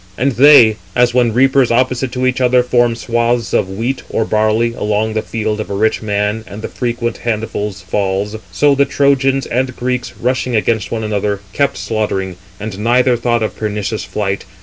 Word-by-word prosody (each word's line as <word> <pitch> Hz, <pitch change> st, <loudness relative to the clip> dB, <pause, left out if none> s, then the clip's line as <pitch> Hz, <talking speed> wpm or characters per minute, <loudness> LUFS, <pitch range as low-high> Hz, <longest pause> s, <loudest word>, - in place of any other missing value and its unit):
And 135 Hz, +3 st, +1 dB
they,—as 120 Hz, -4 st, +5 dB
when 120 Hz, -2 st, +3 dB
reapers 130 Hz, +2 st, +3 dB
opposite 125 Hz, +1 st, +1 dB
to 130 Hz, 0 st, -1 dB
each 130 Hz, 0 st, 0 dB
other 125 Hz, 0 st, +4 dB
form 120 Hz, -1 st, +2 dB
swathes 120 Hz, 0 st, -1 dB
of 95 Hz, -, +1 dB
wheat 115 Hz, +7 st, -3 dB
or 115 Hz, -, 0 dB
barley 110 Hz, +2 st, +1 dB
along 105 Hz, 0 st, -1 dB
the 110 Hz, -, 0 dB
field 110 Hz, -1 st, -3 dB
of 110 Hz, -, -5 dB
a 100 Hz, -, -3 dB
rich 110 Hz, +2 st, +1 dB
man, 105 Hz, +1 st, -1 dB
and 105 Hz, +2 st, -9 dB
the -, -, -2 dB
frequent 120 Hz, -1 st, -3 dB
handfuls 105 Hz, -3 st, -3 dB
fall,—so 100 Hz, +6 st, 0 dB
the 140 Hz, 0 st, +3 dB
Trojans 135 Hz, -1 st, +1 dB
and 130 Hz, +1 st, -2 dB
Greeks, 125 Hz, 0 st, -3 dB
rushing 125 Hz, 0 st, -1 dB
against 110 Hz, 0 st, 0 dB
one 110 Hz, -1 st, -2 dB
another, 105 Hz, -1 st, -2 dB
kept 140 Hz, -1 st, 0 dB
slaughtering: 95 Hz, -5 st, -2 dB, 0.2 s
and 105 Hz, -2 st, -6 dB
neither 125 Hz, +3 st, +3 dB
thought 120 Hz, -1 st, 0 dB
of 110 Hz, -, -3 dB
pernicious 105 Hz, 0 st, -3 dB
flight. 95 Hz, -2 st, -3 dB
115 Hz, 170 wpm, -16 LUFS, 105-125 Hz, 0.2 s, they,—as